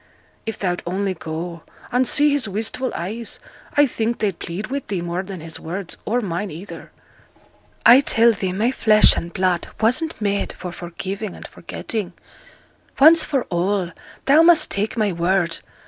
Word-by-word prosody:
If 225 - -2
thou'd 180 -2 -2
only 190 +2 -1
go, 165 0 -6 0.3
and 250 +1 +2
see 295 0 +4
his 280 -7 +1
wistful 220 +5 -1
eyes 215 +7 -4 0.4
I 290 - +7
think 230 -2 -2
they'd 200 -5 -2
plead 200 +8 -6
wi' 280 +1 -1
thee 195 -3 -2
more 175 +1 -2
than 190 -3 -8
his 160 0 -8
words, 175 +2 -6
or 240 +3 0
mine 190 0 -3
either.' 175 +5 -10 0.9
'I 240 +3 +9
tell 235 -4 +4
thee 195 -4 -3
my 215 +7 0
flesh 215 -4 +5
and 170 - -4
blood 180 -1 0
wasn't 255 +8 +1
made 200 -1 -1
for 180 - -7
forgiving 185 +4 -6
and - - -10
forgetting. 215 -6 -5 0.9
Once 320 +4 +8
for 270 -4 -1
all, 180 +1 0 0.3
thou 290 +4 +6
must 335 0 +5
take 210 +4 -2
my 210 -3 +1
word. 175 0 0
200 Hz, 160 wpm, -21 LUFS, 175-235 Hz, 0.9 s, I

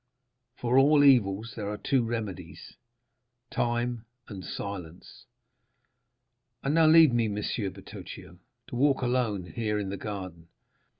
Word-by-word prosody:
For 125 +1 +2
all 145 +1 +5
evils 115 -5 +3
there 105 -3 -4
are 105 - -4
two 130 +3 +1
remedies—time 120 +2 -5 0.2
and 95 -4 -8
silence. 90 0 -8 1.4
And 140 - 0
now 160 -1 +5
leave 160 -4 +7
me, 115 -2 +2
Monsieur 105 0 -2
Bertuccio, 95 -1 -11 0.3
to - - -6
walk 135 +1 +2
alone 120 -7 0
here 110 -3 -2
in 100 -2 -3
the 100 - -4
garden. 95 -6 -7
115 Hz, 120 wpm, -28 LUFS, 100-125 Hz, 1.4 s, leave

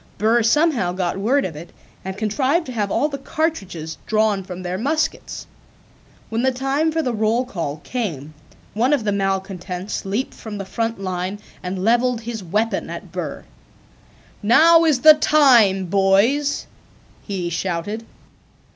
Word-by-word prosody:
Burr 225 +3 +3
somehow 235 - +2
got 185 0 -2
word 265 +8 +2
of 165 - -5
it 165 +3 -9 0.3
and 190 0 -6
contrived 265 - 0
to 255 - -7
have 210 -4 -1
all 290 - +1
the 280 -2 -6
cartridges 190 - -3
drawn 215 -2 +1
from 180 0 -8
their 180 +1 -3
muskets. 310 +6 -2 0.8
When 225 +1 -1
the 260 +1 +2
time 270 +5 0
for 320 0 -1
the 250 - -1
roll 220 +3 +1
call 165 - -5
came 160 - -4 0.4
one 245 +7 +2
of 275 -6 +1
the 210 - 0
malcontents 190 -1 -3
leaped 205 +7 -2
from 215 -2 -8
the 195 - -5
front 225 +3 -3
line 185 +1 -3 0.2
and 185 0 -4
leveled 240 +2 +2
his 230 -3 -6
weapon 215 +6 -1
at - - -8
Burr. - - -5 1.0
"Now 325 +10 +6
is 295 -6 +2
the 310 0 +10
time, 245 -11 +4
boys!" 200 - +2 0.6
he 185 -4 -4
shouted. 185 +5 -3
215 Hz, 150 wpm, -21 LUFS, 190-260 Hz, 1.0 s, the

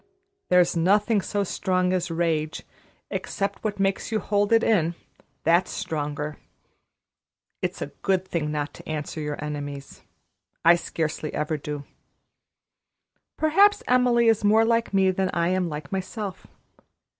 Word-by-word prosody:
There's 180 -1 +4
nothing 205 +5 +3
so 205 +1 -1
strong 185 -1 0
as 180 -1 -1
rage, 165 -2 -1 0.5
except 200 0 -3
what 210 -2 -2
makes 195 +3 0
you 220 - +1
hold 205 +1 0
it 225 0 +5
in 170 -6 +2 0.5
that's 170 +3 +3
stronger. 150 -1 -3 1.2
It's - - -2
a - - -8
good 190 -1 +1
thing 160 -5 -2
not 145 -1 -3
to - - -12
answer 155 0 -4
your 150 -1 -3
enemies. 145 -2 -6 0.6
I 170 - +9
scarcely 160 -2 -3
ever 150 +1 -1
do. 145 -1 -5 1.5
Perhaps 395 +7 +4
Emily 245 -2 +4
is 225 -2 +3
more 220 +2 +5
like 230 0 +1
me 190 -1 +3
than 190 0 0
I 170 0 +2
am 185 -1 0
like 150 -2 -7
myself. 195 +1 -5
180 Hz, 135 wpm, -25 LUFS, 155-205 Hz, 1.5 s, I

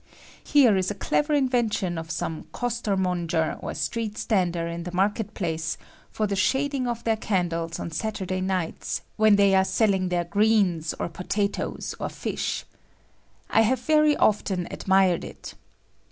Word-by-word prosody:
Here 260 -8 +5
is 185 0 0
a 205 - -3
clever 295 +9 +1
inven 250 -4 +1
tion 180 -5 -2
of 165 0 -8
some 165 -1 -4
costermonger 185 -9 -1
or - - -5
strect 225 -3 -3
stander 175 -5 0
in 170 0 -4
the 175 +1 -6
market 205 +4 0
place 165 -4 -2 0.3
for 215 - -1
the 200 -1 -1
shading 265 +6 +1
of 235 -1 -3
their 225 -1 +2
can 185 -5 0
dles 165 0 -3
on 170 - -5
Saturday 190 -1 -3
nights, 185 -3 -2
when 215 -1 +5
they 200 -1 +4
are 190 0 +5
selling 190 -2 +1
their 175 -1 +1
greens, 200 -4 +2
or - - -1
potatoes, 200 +4 -2
or - - -2
fish. - - -3 0.9
I 225 - +5
have 250 +4 +2
very 305 -1 +4
often 190 -4 +1
admired 190 -2 +2
it. - - -9
195 Hz, 155 wpm, -25 LUFS, 175-220 Hz, 0.9 s, Here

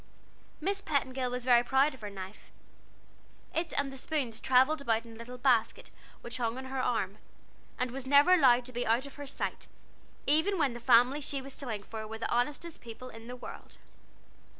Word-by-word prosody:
Miss 395 +5 -1
Petingill 260 -6 -1
was 250 0 -4
very 240 -2 +6
proud 270 +4 +3
of 260 - -14
her 210 - -5
knife. 195 0 -9 1.0
It 330 0 -1
and 275 -1 0
the - - -7
spoons 260 -5 -2
travelled 265 +4 +4
about 230 -3 0
in 230 - -11
a - - -12
little 235 +2 -9
basket 245 -3 +1 0.3
which 235 - -6
hung 235 -1 -1
on 260 - -6
her 260 0 -2
arm, 215 -5 -1 0.6
and 250 -1 -1
was 265 +1 -5
never 285 +6 +6
allowed 255 -8 +5
to 255 - -8
be 245 +1 -1
out 235 +4 +2
of 280 - -10
her 285 -1 -7
sight, 270 - -4 0.6
even 320 +7 +2
when 285 -7 +2
the 240 - -7
family 245 +5 +5
she 280 0 -2
was 270 0 -9
sewing 225 -8 -5
for 220 0 -7
were 220 +1 -6
the 225 - -3
honestest 295 +7 -1
people 240 +2 -9
in 225 -1 -11
the 250 - -6
world. 250 - -10
255 Hz, 195 wpm, -31 LUFS, 235-280 Hz, 1.0 s, very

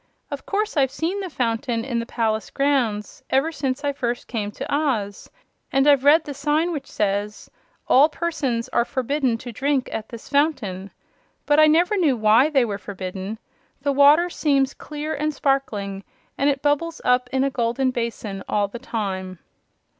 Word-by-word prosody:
"Of 285 - -6
course 415 -3 -1
I've 270 -2 +3
seen 335 +8 -2
the 380 -2 -4
fountain 230 -3 -1
in 240 -3 -1
the 230 - -4
palace 220 -3 -1
grounds, 260 -7 0
ever 275 +5 +2
since 275 -2 -3
I 285 -1 0
first 240 -3 -3
came 215 -4 -3
to - - -5
Oz; 235 -10 -1 0.4
and 270 0 +3
I've 280 -3 +5
read 305 +3 +6
the 290 - -6
sign 300 +5 0
which 285 -4 -5
says: 205 0 -2 0.4
'All 285 +4 +6
Persons 290 -7 -2
are - - +2
Forbidden 260 0 -1
to 245 +1 -8
Drink 275 +2 0
at 220 0 -5
this 230 -2 -10
Fountain.' 250 - 0 0.6
But 295 +1 +4
I 310 - +7
never 345 +6 +3
knew 300 -9 +2
WHY 220 +6 +5
they 270 -5 +3
were 205 -3 -4
forbidden. 190 +1 -6 0.5
The 285 - +2
water 290 +5 +6
seems 275 -5 +1
clear 300 +1 -5
and 305 +1 -1
sparkling 210 -9 -1 0.3
and 280 - +2
it 275 -1 -1
bubbles 310 +3 0
up 250 0 +2
in 265 0 +1
a 275 - 0
golden 245 +2 0
basin 230 -5 -4
all 205 -1 +1
the 235 +4 -8
time." 190 -6 -4
265 Hz, 175 wpm, -23 LUFS, 225-290 Hz, 0.6 s, I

